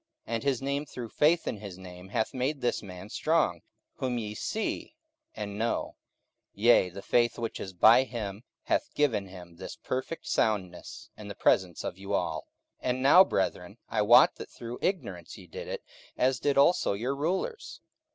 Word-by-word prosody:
44:003:016 115 - -4
And 115 - -1
his 135 -3 0
name 140 +2 -1
through 120 -3 -7
faith 160 +7 +2
in - - -2
his 100 -3 -9
name 90 0 -11
hath 110 +3 -1
made 135 +3 -1
this 120 - 0
man 90 -1 -9
strong, 155 - +1 0.4
whom 125 -2 -1
ye 105 -2 -4
see 220 - -3 0.4
and 105 -1 -5
know: 115 +1 -1 0.6
yea, 105 -3 +5
the 95 +2 -9
faith 120 -1 +2
which 115 -1 -4
is 95 - -5
by 110 +7 +7
him 110 -4 -5 0.2
hath - - 0
given 115 -10 +1
him 90 -2 -12
this 95 - -7
perfect 130 +6 -4
soundness 95 -5 -2
in 105 - -10
the 100 - -7
presence 90 -4 +2
of 90 - -5
you 100 +1 -2
all. - - -2 0.3
44:003:017 - - -2
And 130 +1 -1
now, 165 +7 +9
brethren, 95 - -2
I 110 - +1
wot 115 +4 +6
that - - -8
through 120 +1 -8
ignorance 190 -1 -3
ye - - -12
did 475 0 -8
it, - - -5 0.3
as 130 0 +2
did 145 -1 +1
also 140 - +4
your 120 +7 -2
rulers. 190 - -3
115 Hz, 180 wpm, -29 LUFS, 100-140 Hz, 0.6 s, now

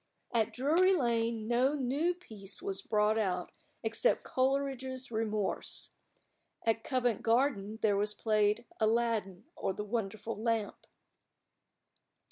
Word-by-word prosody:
At 225 -2 +2
Drury 335 +9 +4
Lane 230 -5 0
no 250 +5 +3
new 290 +6 0
piece 215 - -7
was 195 0 -3
brought 215 +1 +2
out 180 -4 -1 0.3
except 230 - +2
Coleridge's 260 -1 -1
"Remorse." 215 -2 -1 0.7
At 225 0 +2
Covent 245 -5 +1
Garden 225 -3 +1
there 210 -2 +4
was 210 +1 0
played 215 +1 +2
"Aladdin, 220 -4 +1
or 190 - -1
the 210 - -4
Wonderful 220 0 -3
Lamp." 225 -2 -1
225 Hz, 110 wpm, -32 LUFS, 210-255 Hz, 0.7 s, Drury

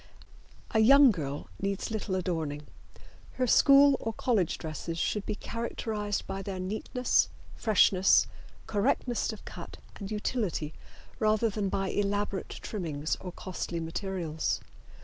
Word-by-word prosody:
A 220 - +2
young 275 +4 +8
girl 145 -6 -4
needs 195 +2 -2
little 215 -3 -2
adorning. 160 -5 -2 0.7
Her 255 - 0
school 275 +3 +7
or 225 - -3
college 210 -8 +1
dresses 160 +1 -5
should 205 +4 -1
be - - -1
characterized 215 -2 -3
by 195 - -4
their 190 -1 -5
neatness, 215 +6 +1 0.3
freshness, 195 -3 +5 0.4
correctness 225 +4 0
of 215 - -10
cut - - -9 0.2
and 195 -2 -6
utility 210 -8 -2 0.5
rather 215 +1 +2
than 200 -1 -1
by 195 0 -1
elaborate 205 -1 -1
trimmings 160 -7 -3
or 180 - -6
costly 175 -1 -5
materials. 165 -1 -2
200 Hz, 125 wpm, -29 LUFS, 180-220 Hz, 0.7 s, young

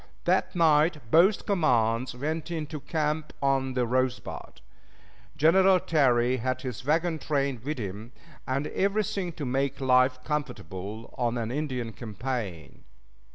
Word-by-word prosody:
That - - +1
night 155 -6 +3
both 185 +6 +5
commands 125 - +1
went 155 +5 -3
into 155 -2 -4
camp 155 +1 -2
on 135 -1 +1
the 125 -1 +2
Rosebud. 130 +1 -2 0.8
General 185 +4 +5
Terry 130 -6 +2
had 130 +2 -2
his 125 -3 -5
wagon 160 +3 +1
train 140 -5 -1
with 150 +2 -3
him, 105 +1 -6 0.4
and 135 +3 -1
everything 195 -1 -1
to 150 - -5
make 135 +2 -1
life 130 -1 +4
comfortable 110 - -5
on 120 0 0
an 115 -1 -2
Indian 130 -5 -3
campaign. 105 - -5
135 Hz, 125 wpm, -27 LUFS, 120-155 Hz, 0.8 s, both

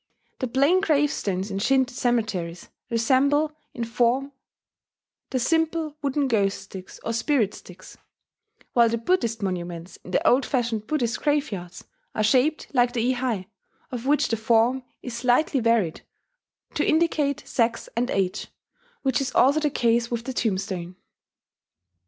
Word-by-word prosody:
The 255 - -1
plain 280 +9 +3
gravestones 280 - 0
in 195 - -2
Shinto 265 +4 +2
cemeteries 215 -9 -1 0.2
resemble 280 +6 +2 0.2
in 235 - -4
form 245 +4 +1 1.0
the 260 - -1
simple 320 +3 0
wooden 280 0 0
ghost 200 -5 +1
sticks, 190 -1 -10
or 230 - -1
spirit 230 -3 +1
sticks; 185 +1 -13 0.7
while 235 -1 +5
the 230 - 0
Buddhist 230 - 0
monuments 175 -2 -4
in - - -14
the - - +1
old 260 +3 +5
fashioned 235 -6 -1
Buddhist 240 -6 -1
graveyards 210 - -2 0.3
are 215 - +1
shaped 265 +9 +2
like 245 -2 +3
the 245 +1 +1
ihai, 245 -7 -2 0.5
of 250 0 -5
which 295 +1 +3
the 225 - 0
form 230 +3 +2 0.2
is 250 - -6
slightly 250 +4 +2
varied 230 -8 +1 0.7
to - - 0
indicate 310 -3 +1
sex 230 -2 0
and 245 +2 0
age, 190 -2 -1 0.6
which 265 -1 +1
is 265 -2 -2
also 280 +4 +5
the 300 -1 +1
case 235 -2 +1
with 235 -1 -3
the 260 - -4
tombstone. 185 -6 -2
240 Hz, 140 wpm, -25 LUFS, 215-275 Hz, 1.0 s, while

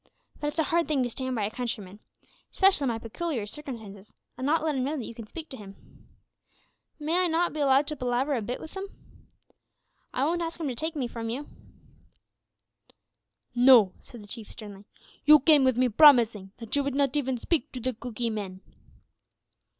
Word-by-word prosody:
But 295 - -3
it's 295 - -4
a 320 - +3
hard 340 0 +1
thing 285 -4 +1
to 245 - -3
stand 260 +1 -3
by 220 - -1
a 210 - -3
countryman, 215 -5 -5 0.5
specially 380 -7 +3
in - - +1
my 230 - -1
pecooliar 230 +1 -4
circumstances, 220 -6 -9 0.2
an' 260 - -3
not 310 +1 +2
let 315 -1 0
him 260 -2 -1
know 295 +4 -2
that 245 - -5
you - - -8
can 225 -1 -10
speak 320 +6 -8
to 265 - -8
him. 200 -2 -15 0.9
May 320 +4 0
I 365 - +3
not 340 +1 0
be 310 - -5
allowed 275 0 +4
to 300 - -3
palaver 255 +2 -1
a 245 - -1
bit 240 +4 -4
with 315 - -11
'em? 390 +1 -5 1.2
I 260 - 0
wont 345 +3 0
ask 335 0 -4
'em 320 - -2
to - - -3
take 315 +6 -3
me 265 -5 -2
from 230 -1 -6
you." 270 +6 -4 2.1
"No," 245 -6 +6
said 235 -4 -12
the - - -14
Chief 220 0 -6
sternly. 205 -2 -11 0.4
"You 300 +1 +8
came 295 0 +5
with 260 -2 +2
me 255 0 +3
promising 230 -6 +5
that 230 +1 -4
you 285 - +2
would 275 -1 -3
not 280 -1 +1
even 265 -3 0
speak 300 +3 0
to 255 - -5
the 255 +2 -1
Cookee 235 0 -4
men." 195 -3 -6
255 Hz, 200 wpm, -27 LUFS, 225-300 Hz, 2.1 s, You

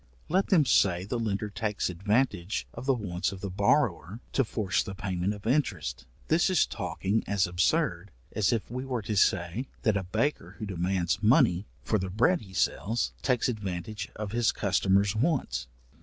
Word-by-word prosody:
Let 190 +4 +2
them 170 -8 +4
say 90 -7 +3
the 120 +4 -2
lender 105 -2 -2
takes 105 +2 -1
advantage 100 +1 0
of 120 +3 -8
the 135 - +5
wants 95 -4 -2
of 95 - -8
the 100 - -4
borrower, 105 0 +1
to 135 - +3
force 105 -5 0
the 95 - -6
payment 95 -2 -2
of 105 -1 -8
interest, 105 - -1 0.2
this 165 +4 +3
is 185 -4 +4
talking 100 +1 -2
as 100 -1 +2
absurd 90 0 +1 0.3
as 105 -3 +2
if 115 -2 -2
we 125 +1 -3
were 125 -4 -3
to 105 +1 -2
say, 95 +5 +1 0.2
that 110 -5 +3
a 100 - +1
baker 110 +11 -2
who 110 - -5
demands 95 0 -1
money 110 - +4 0.2
for 110 - +1
the 95 0 -3
bread 125 - +2
he 95 -3 -13
sells, 115 +4 0
takes 125 -3 +1
advantage 105 -3 -4
of 105 -1 -5
his 120 0 +2
customer's 100 +2 +2
wants. 120 - 0
105 Hz, 175 wpm, -28 LUFS, 95-120 Hz, 0.3 s, the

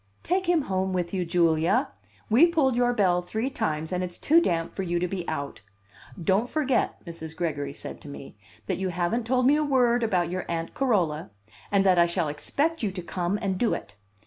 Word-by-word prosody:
"Take 370 +1 0
him 335 -4 +3
home 190 -3 -1
with 175 -1 -2
you, 185 -2 -1
Julia. 170 - +2 0.4
We 250 +11 +6
pulled 300 -7 +2
your 245 0 +3
bell 185 -6 +2
three 220 +9 -3
times, 155 -7 -2
and 180 0 -1
it's 175 -1 -5
too 330 +3 +4
damp 165 - -1
for - - -4
you 175 -2 -1
to 180 +1 0
be 180 -1 -5
out. 140 -7 -4 0.6
Don't 195 +8 +1
forget," 275 -5 0
Mrs. 165 -2 -7
Gregory 145 -5 -2
said - - -8
to 145 - -10
me, 140 -4 -10 0.3
"that - - -2
you 190 -1 -1
haven't 180 +7 -1
told 255 0 +2
me 285 +3 +5
a 305 - +1
word 250 -4 +3
about 180 -6 +1
your 185 0 -3
Aunt 165 -1 -3
Carola, 175 - 0 0.4
and 200 -1 +4
that 185 -2 +4
I 170 - +5
shall 170 -2 -1
expect 300 - -1
you 215 - 0
to 185 -2 -6
come 180 +3 -2
and 190 -2 -1
do 235 - +2
it." 105 - -9
185 Hz, 210 wpm, -26 LUFS, 170-245 Hz, 0.6 s, We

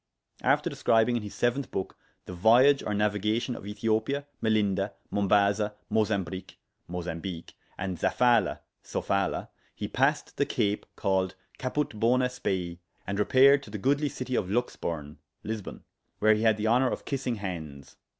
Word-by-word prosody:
After - - +2
describing 115 +2 +2
in 120 - 0
his 105 -1 -8
7th 120 +2 0
book 95 - -4 0.3
the - - -7
viage 120 +10 +5
or 105 - -2
navigation 105 +4 0
of 100 - -9
Ethiopia, 110 +7 -1 0.2
Melinda, 100 -3 +1 0.2
Mombaza, 100 +1 +2 0.2
Mozambrich 100 -4 -1 0.3
(Mozambique), 85 0 -5 0.2
and 95 -2 -4
Zaphala 120 -4 +2 0.2
(Sofala), 100 0 -1 0.3
he - - -4
passed - - 0
the - - +2
Cape 105 0 -1
called 95 -1 0 0.2
Caput 145 +2 -1
Bonæ 125 +4 +2
Spei, 90 -8 -3 0.3
and 100 +1 -3
repaired 135 +6 +6
to 140 - -12
the 105 - -5
goodly 140 +7 +1
citie 130 -1 -4
of 95 - 0
Luxburne 80 -9 -3 0.2
(Lisbon), 110 -2 -5 0.3
where 110 +1 +5
he 105 - 0
had 110 -1 +4
the 105 - -2
honour 125 +3 +4
of - - -5
kissing 130 -3 -2
hands. 80 -9 -7
105 Hz, 145 wpm, -28 LUFS, 95-120 Hz, 0.3 s, repaired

